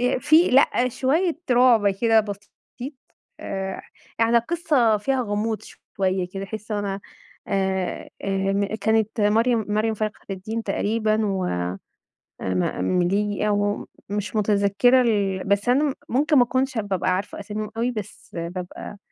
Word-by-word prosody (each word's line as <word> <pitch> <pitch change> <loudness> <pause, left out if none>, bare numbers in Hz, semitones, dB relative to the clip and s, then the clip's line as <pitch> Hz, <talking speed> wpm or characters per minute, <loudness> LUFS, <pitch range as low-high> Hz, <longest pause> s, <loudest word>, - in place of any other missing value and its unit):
ي - - -2
في 310 +6 +5
لأ، 255 -1 +4
شويّة 315 +8 +1
رعب 240 -4 +5
كده 225 +3 +3
بسيط، 210 +6 -7 0.5
آآ، 190 -1 -4 0.4
يعني 230 +1 +4
القصّة 260 -5 +2
فيها 260 +5 0
غموض 215 0 -2
شويّة 185 -2 -3
كده، 195 0 -4
أحس 215 +2 -7
إن - - 0
هو - - 0
أنا 200 -1 -3 0.5
آآ، 190 -2 -1
آآ - - -4 0.3
م 200 0 +1 0.2
كانت 220 0 +1
مريم 225 +2 +3
مريم 215 +2 +1
فخر 215 0 -4
الدين 220 +4 -4
تقريبًا 215 +1 0
و 190 -2 -1
آآ 90 - -2 0.6
م 90 -1 0
المليجي 195 - 0
أو 205 0 +1
م - - -8 0.2
مش 210 +1 -3
متذكرة 210 +4 +3
ال 200 -5 +1
بس 200 +4 +1
أنا 275 +4 +4
م - - -2 0.2
ممكن 290 +4 +3
ما 245 - +7
أكونش 260 +1 -1
هاب 205 -2 -2
بابقى 190 -1 0
عارفة 200 +2 -5
أساميهم 210 +1 -5
أوي، 240 +2 +1
بس 215 -2 -8
بابقى 180 +4 -6
210 Hz, 155 wpm, -23 LUFS, 195-235 Hz, 0.6 s, ما